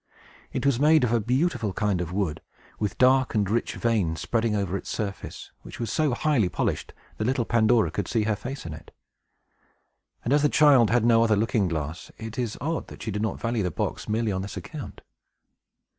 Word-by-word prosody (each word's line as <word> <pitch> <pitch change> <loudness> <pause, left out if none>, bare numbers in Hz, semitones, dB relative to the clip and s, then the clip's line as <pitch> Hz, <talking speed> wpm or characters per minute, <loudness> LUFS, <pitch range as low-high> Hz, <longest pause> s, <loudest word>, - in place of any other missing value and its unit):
It - - -3
was 140 -4 +3
made 155 +1 +5
of 120 -1 +1
a 120 - +3
beautiful 125 - 0
kind 100 -4 0
of 85 -1 -4
wood, 90 -5 -2 0.4
with 105 -2 -2
dark 130 -1 +4
and 105 -2 +2
rich 115 +4 -1
veins 100 -9 0
spreading 115 -2 0
over 100 -2 -1
its - - -5
surface, 100 -3 -5
which - - -11
was 115 -3 -2
so 150 -6 +1
highly 125 -10 +2
polished 90 - -2 0.3
that 110 - -2
little 125 -1 +1
Pandora 110 -6 +3
could 100 +2 -3
see 115 -3 +1
her 110 0 +1
face 135 +4 -7
in 80 - -5
it. 80 - -11 1.4
As 145 +5 +3
the 150 - +3
child 140 -8 +5
had 120 -1 +2
no 115 -1 +5
other 110 -2 +3
looking 105 -1 +1
glass, 80 -1 -4
it 110 +1 -6
is 120 -3 -2
odd 160 +5 -2
that - - -10
she 110 - -3
did 105 +1 -2
not 110 -3 -2
value 115 -1 -1
the 90 - 0
box, 80 - -3
merely 110 0 0
on 95 -1 -2
this 100 +1 -6
account. - - -8
110 Hz, 205 wpm, -26 LUFS, 100-125 Hz, 1.4 s, made